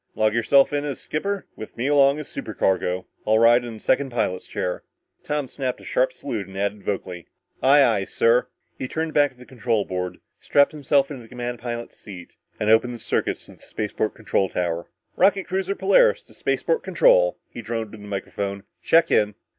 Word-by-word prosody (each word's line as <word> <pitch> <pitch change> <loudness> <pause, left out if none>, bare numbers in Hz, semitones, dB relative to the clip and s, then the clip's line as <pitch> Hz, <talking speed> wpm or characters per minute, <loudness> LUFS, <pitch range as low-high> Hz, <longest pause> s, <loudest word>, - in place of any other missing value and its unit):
"Log 110 0 +2
yourself 135 +5 +4
in 145 0 0
as 145 -3 -4
skipper 200 +5 -3
with 110 - -10
me 120 - -2
along 140 0 +4
as 150 - -6
supercargo. 95 -3 -1 0.2
I'll 110 +1 +4
ride 120 +2 +5
in 120 -2 -7
the - - -11
second 135 +4 +1
pilot's 105 -7 -2
chair." 90 - -3 0.4
Tom 150 -2 -2
snapped 130 0 -3
a - - -15
sharp - - +1
salute 115 - -5
and 95 0 -10
added 100 +1 -2
vocally, 95 -3 -4 0.3
"Aye, 140 +2 +6
aye, 110 -6 +2
sir!" 115 +4 +2 0.3
He 130 - -3
turned 160 +3 -3
back 145 -1 +4
to - - -29
the 125 - -14
control 115 -4 -1
board, 90 -1 -4 0.2
strapped 140 0 +3
himself 140 -1 +1
into 135 -4 -7
the 115 - -15
command 120 -1 -5
pilot's 120 -1 -6
seat 90 -4 -11 0.2
and 105 - -1
opened 115 +3 +3
the - - -7
circuit - - -1
to - - -14
the - - -27
spaceport 110 0 -3
control 105 -4 0
tower. 85 -1 -2 0.3
"Rocket 195 -1 +3
cruiser 190 +1 -2
Polaris - - +4
to - - -20
spaceport 480 -1 0
control," - - +4
he 120 - -7
droned 115 -1 -4
into 110 - -10
the 105 - -11
microphone. 100 0 -4 0.2
"Check 165 +1 +4
in!" 105 -1 +2
120 Hz, 195 wpm, -23 LUFS, 105-145 Hz, 0.4 s, Aye